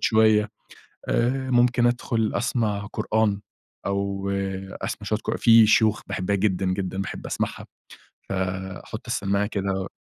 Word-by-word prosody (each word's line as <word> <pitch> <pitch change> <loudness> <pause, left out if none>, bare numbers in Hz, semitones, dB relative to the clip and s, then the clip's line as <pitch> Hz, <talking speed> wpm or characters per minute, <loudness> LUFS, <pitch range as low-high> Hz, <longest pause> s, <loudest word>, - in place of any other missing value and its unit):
شوية 110 -1 +4 0.6
آآ، 130 +2 +1
ممكن 120 0 +4
أدخل 120 -2 0
أسمع 110 -4 -1
قرآن، 105 -2 +1 0.5
أو 100 0 -1 0.5
أسمع - - -4
شوية - - +1
قر - - -3
في 115 -1 +7
شيوخ 110 0 +3
باحبها 95 +2 -1
جدًا، 95 -1 0
جدًا، 95 0 -2
باحب - - -6
أسمعها - - -3 0.6
فأحط 95 0 -4
السماعة 100 +1 0
كده 95 -2 -2
105 Hz, 120 wpm, -24 LUFS, 95-115 Hz, 0.6 s, في